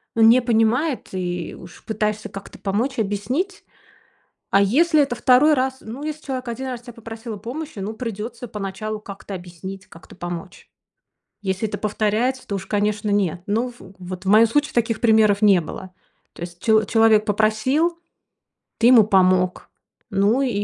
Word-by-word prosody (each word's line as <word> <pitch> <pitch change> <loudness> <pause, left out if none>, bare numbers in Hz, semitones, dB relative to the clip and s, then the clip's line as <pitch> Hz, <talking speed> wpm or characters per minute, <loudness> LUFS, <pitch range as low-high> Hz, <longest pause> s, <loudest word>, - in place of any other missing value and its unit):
ну, 230 - +2
не 230 +3 +7
понимает, 240 +5 +1
и 175 -3 -3
уж 175 0 -13
пытаешься 215 0 -2
как-то 195 0 -10
помочь, 230 +7 -1
объяснить. 225 - -2 0.9
А 195 - +4
если 310 - +3
это 275 -3 -1
2 255 +5 +5
раз 260 -1 -1
Ну, 235 +6 -8
если 305 0 -6
человек 260 -2 -4
1 240 +3 -4
раз 245 -2 -5
тя 240 0 -10
попросил 230 0 -8
о - - -8
помощи, 265 +6 -7
ну, 205 +3 -4
придется 230 +1 -6
поначалу 210 +1 -5
как-то 200 -1 -10
объяснить, 185 +2 -8
как-то 165 0 -15
помочь. 175 +1 -7 0.7
Если 195 +2 -1
это - - -5
повторяется, 215 +5 -1
то 200 - -2
уж, 190 - -7
конечно, 210 0 0
нет. 185 -4 0
Ну, 225 +5 0
в 190 0 -14
вот 185 0 -7
в - - -3
моем 215 +3 +7
случае 290 +6 0
таких 230 -1 0
примеров 220 -3 +4
не 200 -4 +6
было. 185 +3 -8 0.4
То - - -10
есть 175 0 -8
чел 220 -1 +4
человек 225 -1 +4
попросил, 220 - +1 0.8
ты 230 - +5
ему 245 -3 +8
помог. 185 -2 +2 0.4
Ну, 205 +6 +2
и 270 - +1
215 Hz, 165 wpm, -22 LUFS, 195-245 Hz, 0.9 s, ему